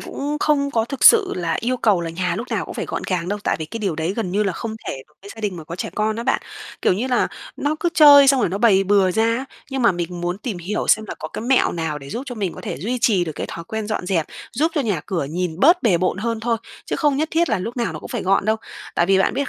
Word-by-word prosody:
cũng 290 +2 -4
không 280 -2 +2
có 225 -3 +1
thực 275 +2 -4
sự 425 -5 +7
là 170 -2 -1
yêu 250 +2 0
cầu 210 -7 +2
là 165 -1 -4
nhà 175 +1 -2
lúc 235 +4 -5
nào - - -1
cũng - - -8
phải - - -3
gọn - - -4
gàng 180 -2 -1
đâu, 205 - -2
tại - - +1
vì 160 - -4
cái 225 +9 -7
điều 195 -7 -2
đấy 165 +3 -1
gần 220 -6 -2
như 205 +3 +1
là 195 - 0
không 220 +5 -5
thể 135 - -5
đối 150 - -32
với 200 - -10
gia 225 - -10
đình 200 -4 -2
mà 160 - -8
có 170 +2 -7
trẻ - - -4
con 215 0 0
á 230 - -3
bạn. 265 +2 +1 0.4
Kiểu - - +4
như 220 +8 -1
là 250 -2 +1 0.3
nó 290 +2 0
cứ 345 - +2
chơi 285 -3 +8
xong 270 -2 +5
rồi - - +2
nó 195 - -3
bày 200 -4 +4
bừa 195 -1 +3
ra 220 +5 +1
á, 230 +3 0 0.3
nhưng 270 -1 -2
mà 235 -5 +5
mình 175 0 -4
muốn 175 +2 -2
tìm 215 -4 -5
hiểu 180 +5 -3
xem 220 - +4
là - - -4
có - - -6
cái - - -6
mẹo 260 +2 +3
nào 160 -3 -3
để 140 -1 -11
giúp 240 - -4
cho 245 - -5
mình 195 -6 -2
có - - -9
thể - - -5
duy 235 - -2
trì 195 -7 +3
được 160 - -5
cái - - -4
thói 170 - -7
quen 220 +3 -4
dọn 215 -4 -3
dẹp, 170 -5 0 0.3
giúp 310 +8 +1
cho 300 - +2
nhà 210 - -1
cửa 175 -6 -1
nhìn 170 +3 -3
bớt 340 +6 +5
bề 205 -7 +4
bộn 185 0 0
hơn 230 +1 -2
thôi, 230 0 0 0.3
chứ - - -2
không 295 -3 +2
nhất 310 +3 0
thiết 335 +1 +2
là - - +1
lúc 230 +7 -5
nào 235 - -1
nó - - -6
cũng - - -10
phải 240 -6 -3
gọn 195 +1 +2
đâu. 220 +1 +2 0.4
Tại 170 - +2
vì 195 0 +4
bạn 190 - +2
biết 280 -1 -1
210 Hz, 315 wpm, -21 LUFS, 180-250 Hz, 0.4 s, chơi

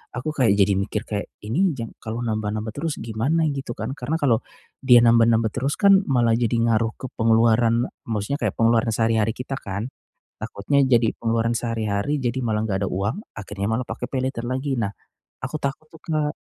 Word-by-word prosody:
aku 130 +5 -3
kayak 125 -9 +3
jadi 100 0 +3
mikir 100 +1 -2
kayak, 105 -1 -4 0.2
ini 160 - +1
jang 115 -2 -5
kalau 115 +2 -5
nambah-nambah 110 0 -2
terus 150 +4 -3
gimana 130 +9 0
gitu, 135 -3 -4
kan. - - -4
Karena 145 +6 -2
kalau 120 -6 +3 0.4
dia 125 -3 +7
nambah-nambah 115 -1 +4
terus, 135 +5 -1
kan, 195 -1 +5
malah 120 -4 +3
jadi 120 0 0
ngaruh 115 -1 +1
ke 130 - -4
pengeluaran 115 +1 +3 0.2
maksudnya 110 +5 -2
kayak - - 0
pengeluaran 115 0 +3
sehari-hari 110 -1 +1
kita, 130 +2 -5
kan. 100 +2 -5 0.5
Takutnya 140 +8 0
jadi 120 -3 +3
pengeluaran 115 0 0
sehari-hari 115 +3 -1
jadi 120 +1 -1
malah 110 -2 0
enggak 100 -2 -1
ada - - -3
uang, 105 - -2
akhirnya 100 -1 -4
malah 125 +2 -1
pakai - - -4
paylater 130 -2 -2
lagi. 130 +1 -2
Nah, 100 -3 -1 0.5
aku 130 +4 -4
takut, 140 +3 -3
tuh, 160 - -15
Kak. 155 -2 -1
115 Hz, 180 wpm, -23 LUFS, 110-135 Hz, 0.5 s, dia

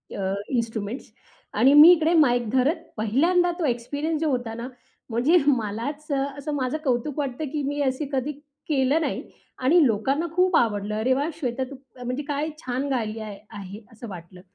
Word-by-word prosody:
अ, 190 -1 -1 0.2
instruments 230 -1 -3 0.4
आणि 255 +6 +5
मी 300 +4 +10
इकडे 330 -1 +3
mic 245 -8 +3
धरत 265 +6 +2 0.2
पहिल्यांदा 335 - +2
तो 335 - 0
एक्सपिरियन्स 285 +6 -2
जो 315 - +1
होता 245 -4 -2
ना, 235 +2 -6 0.4
म्हणजे 245 +10 +3
मलाच 255 +4 -1
अ, 275 -1 +1 0.2
असं 295 +1 -4
माझं 260 +1 -1
कौतुक 260 +2 -1
वाटतं 280 +1 -2
की 295 - -1
मी 290 +1 -2
असे 265 +2 0
कधी 270 +2 0 0.4
केलं 280 +1 +2
नाही - - -2 0.4
आणि 310 +4 +5
लोकांना 265 +9 0
खूप 365 -1 +3
आवडलं. 210 -2 0
अरे 255 +4 +2
वा! 285 +4 0
श्वेता 255 -3 -2
तू - - -7 0.3
म्हणजे 250 +4 -3
काय 295 +1 -1 0.2
छान 255 +2 -2
गायली 225 -4 -2
आहे 210 -2 -7 0.2
आहे 200 +1 -8
असं 230 +1 -10
वाटलं. 180 0 -10
260 Hz, 175 wpm, -24 LUFS, 230-295 Hz, 0.4 s, मी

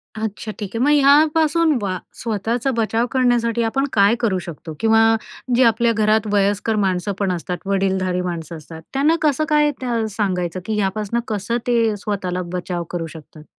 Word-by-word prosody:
अच्छा, 220 0 -4
ठीक 205 - -4
आहे. - - -1
मग - - +3
ह्यापासून 310 +2 +4
वा 185 -2 -2 0.2
स्वतःचा 230 +4 -1
बचाव 225 +1 +1
करण्यासाठी 240 -3 +2
आपण 270 +5 0
काय 205 +2 +4
करू 200 -6 0
शकतो? 160 -1 -8
किंवा 225 0 +4 0.5
जे 255 - +5
आपल्या 235 0 +3
घरात 215 0 +2
वयस्कर 205 +2 +1
माणसं 195 -1 0
पण 195 -2 0
असतात, 180 0 -3
वडीलधारी 190 -2 0
माणसं 170 -2 -5
असतात, 160 +1 -11
त्यांना 290 +4 +3
कसं 305 0 +2
काय 300 -1 +3
त्या 235 -3 -1
सांगायचं 185 -4 -1
की 220 - -2
ह्यापासून 210 +3 -1
कसं 220 +2 -2
ते 230 -3 +2
स्वतःला 190 -3 -3
बचाव 180 -1 -3
करू 165 -2 -3
शकतात? 155 -1 -13
215 Hz, 165 wpm, -20 LUFS, 185-235 Hz, 0.5 s, जे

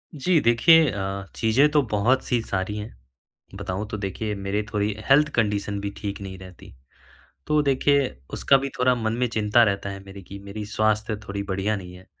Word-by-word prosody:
जी। 160 +4 +2
देखिए 155 +7 +5
अ, 95 -1 -4
चीज़ें 120 +6 +3
तो 150 -1 +4
बहुत-सी 120 +3 +1
सारी 100 -1 -3
हैं। 105 +1 -7 0.6
बताऊँ 100 +3 -4
तो 110 - -4
देखिए 105 +2 -3
मेरे 100 +2 -2
थोड़ी 105 0 0 0.2
हेल्थ 150 +2 +5
कंडीशन 105 -2 0
भी 100 - -3
ठीक 100 -2 -5
नहीं 95 -1 -7
रहती। 90 -6 -13 0.7
तो 150 0 +3
देखिए 140 0 +2 0.3
उसका 135 - +4
भी 135 +1 -3
थोड़ा 125 0 +3
मन 110 -2 -2
में 125 - +2
चिंता 110 +1 +3
रहता 100 -1 -1
है 100 0 -7
मेरे 100 0 -11
की 100 +2 -10
मेरी 100 +2 -6
स्वास्थ्य 110 0 0
थोड़ी 100 0 -3
बढ़िया 95 +3 0
नहीं 90 -2 -9
है। 90 +1 -15
105 Hz, 180 wpm, -24 LUFS, 100-125 Hz, 0.7 s, देखिए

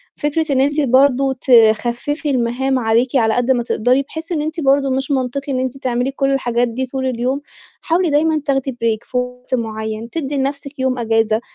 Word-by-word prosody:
فكرة 295 +1 -1
إن 265 -1 +3
أنتِ 290 +2 +1
برضه 270 0 +3
تخفّفي 240 +4 +2
المهام 255 +1 0
عليكِ 235 +3 +1
على 225 -3 +3
قد 245 +1 +1
ما 240 -2 +1
تقدري 250 +4 +1
بحيث 320 +5 -8
إن 310 -3 0
أنتِ 315 +2 -4
برضه 275 -1 +2
مش 270 +2 -1
منطقي 275 +1 -2
إن 255 - 0
أنتِ 260 +1 -3
تعملي 250 0 -1
كل 275 0 0
الحاجات 245 -2 +1
دي 255 +3 -3
طول 260 +1 -4
اليوم. 255 +3 -1 0.4
حاولي 345 0 +1
دايمًا 310 +1 +2
تاخدي 270 -1 0
break 230 -2 -2
في 250 - -1
وقت 250 +1 -4
مُعيّن، 220 0 -4
تدّي 290 -2 -3
لنَفْسِك 280 +1 -3
يوم 260 -1 0
إجازة، 225 -1 +1
260 Hz, 185 wpm, -18 LUFS, 240-280 Hz, 0.4 s, إن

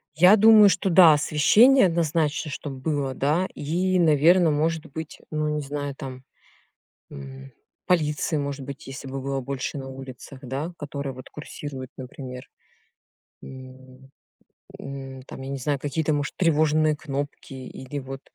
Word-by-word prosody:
Я 180 +7 +7
думаю, 215 -1 +8
что 190 +1 0
да, 170 -2 +8
освещение 195 - +5
однозначно, 160 -2 0
чтоб 140 0 -6
было, 135 0 -2
да. 155 +8 +1
И, 180 +5 0
наверно, 165 +2 +5
может 160 +1 0
быть, 160 +1 -8
ну, 155 0 -1
не 150 0 -1
знаю, 145 0 -4
там, 130 -1 -8 0.9
м, 65 -1 -10 0.3
полиции, 155 -2 +1
может 140 -1 -4
быть, 140 0 -9
если 135 0 -8
бы 135 0 -5
было 135 0 -2
больше 135 +1 -4
на 135 -1 -7
улицах, 130 0 -10
да, 140 +7 -4
которые 140 -2 -5
вот 130 0 -11
курсируют, 145 -3 -8
например. 130 -1 -9 0.9
М. 130 0 -13 0.7
М, 135 -1 -8
там, 135 - -10
я 135 - -7
не 140 - -3
знаю, 140 +1 -1
какие-то 150 +2 -1
может 145 +1 -2
тревожные 155 -2 +3
кнопки 145 -2 -6
или 130 +2 -7
вот, 135 +1 -8
145 Hz, 145 wpm, -24 LUFS, 135-155 Hz, 0.9 s, думаю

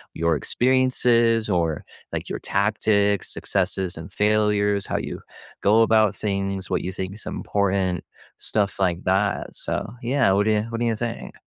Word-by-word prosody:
your 85 -1 +1
experiences 120 - +2
or, 85 -4 0 0.3
like, - - -4
your - - -3
tactics, 100 0 +1
successes, 95 -2 -2
and 80 +3 -8
failures, 105 -1 +2
how - - -1
you - - -5 0.4
go 110 +3 +5
about 110 -3 +3
things, 100 -2 -2
what - - +1
you 95 - -2
think’s 95 +3 -5
important, 95 -2 0 0.5
stuff 100 -2 +1
like 90 -3 +1
that, 95 +2 0
so - - -1 0.3
Yeah, 130 -3 +2
what 100 +2 +2
do 110 - +3
you - - +1
what 115 0 -4
do 120 - +2
you 115 - +1
think? 115 +1 -5
100 Hz, 155 wpm, -23 LUFS, 95-110 Hz, 0.5 s, go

